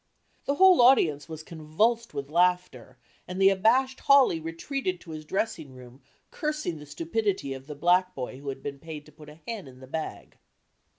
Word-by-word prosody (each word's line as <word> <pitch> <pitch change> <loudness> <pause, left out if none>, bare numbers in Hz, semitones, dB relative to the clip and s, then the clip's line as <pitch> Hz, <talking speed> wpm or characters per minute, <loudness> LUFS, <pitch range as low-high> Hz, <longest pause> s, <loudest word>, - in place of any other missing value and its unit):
The 280 - 0
whole 375 -3 +6
audience 170 - +4
was 160 -1 -7
convulsed 190 +10 -1
with 140 0 -6
laughter 175 -8 0 0.3
and 185 +1 -5
the 195 0 +7
abashed 245 +7 +2
Hawley 275 -11 +5
retreated 180 - -4
to 165 - -10
the 155 - -8
dressing 160 -5 -3
room 125 +1 -14 0.3
cursing 300 - -3
the 150 - -12
stupidity 165 0 -2
of 135 +1 -10
the 150 - -7
black 180 +4 +2
boy 130 0 -6
who 140 0 -6
had 135 0 -7
been 140 -1 -6
paid 155 -1 -9
to 150 - -17
put 150 0 -14
a 155 +2 -15
hen 225 -9 -5
in 130 -1 -14
the 130 - -11
bag. 155 +4 -6
165 Hz, 185 wpm, -27 LUFS, 145-215 Hz, 0.3 s, the